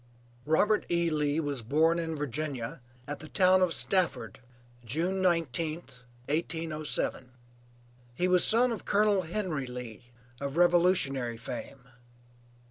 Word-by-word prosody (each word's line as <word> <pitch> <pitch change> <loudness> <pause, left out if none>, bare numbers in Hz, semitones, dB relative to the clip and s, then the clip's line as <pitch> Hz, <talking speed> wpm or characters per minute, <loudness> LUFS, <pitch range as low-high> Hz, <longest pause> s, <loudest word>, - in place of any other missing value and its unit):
Robert 210 +7 +3
E. 170 -1 +1
Lee 150 0 0
was 145 -5 -2
born 160 +8 +2
in 165 -1 -3
Virginia, 145 -4 -4 0.3
at 145 - -4
the 155 - -10
town 185 -1 +4
of 180 -2 +3
Stafford, 185 -3 0 0.4
June 170 - -1
19th, 165 -5 -1 0.2
1807. 155 -4 -2 0.8
He 180 +7 +1
was 180 -1 +4
son 240 +2 +4
of 230 - -5
Colonel 205 -1 +2
Henry 170 -6 -3
Lee, 120 -2 -8 0.3
of 140 +2 -4
revolutionary 170 -9 +3
fame. 125 +2 -7
160 Hz, 120 wpm, -29 LUFS, 135-180 Hz, 0.8 s, town